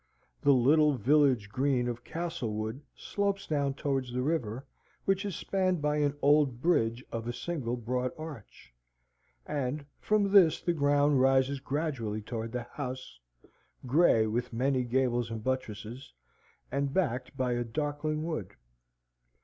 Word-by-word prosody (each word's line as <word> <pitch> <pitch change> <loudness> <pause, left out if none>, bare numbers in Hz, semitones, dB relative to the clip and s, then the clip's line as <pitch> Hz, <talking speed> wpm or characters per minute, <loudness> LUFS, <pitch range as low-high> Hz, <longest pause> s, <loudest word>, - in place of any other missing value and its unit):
The 145 - +5
little 145 +4 +5
village 130 -3 +3
green 130 +1 +1
of 120 0 -4
Castlewood 120 -8 -4
slopes 200 -1 -2
down 140 -3 0
towards 135 -3 -2
the 125 +1 -1
river, 130 -5 -2 0.4
which 195 0 +1
is 200 - -3
spanned 185 -2 0
by 150 0 0
an 145 -1 +1
old 140 -4 +4
bridge 125 -6 +1
of 115 0 -4
a - - 0
single 125 -6 -3
broad 125 +2 -2
arch, 135 - -10 0.7
and 140 +1 -2
from 210 -2 +1
this 180 -6 +6
the 175 - 0
ground 145 -2 +3
rises 135 +1 +3
gradually 130 -7 -3
towards 115 0 -4
the 125 -1 -2
house, 130 +1 -7 0.7
grey 130 -4 +4
with 120 +3 -2
many 130 +2 +1
gables 120 -1 +1
and 115 -1 -5
buttresses, 130 0 -4 0.6
and 140 +1 -1
backed 130 -7 -1
by 125 -2 0
a 120 0 0
darkling 150 +4 -2
wood. 155 - -4
135 Hz, 140 wpm, -30 LUFS, 120-150 Hz, 0.7 s, this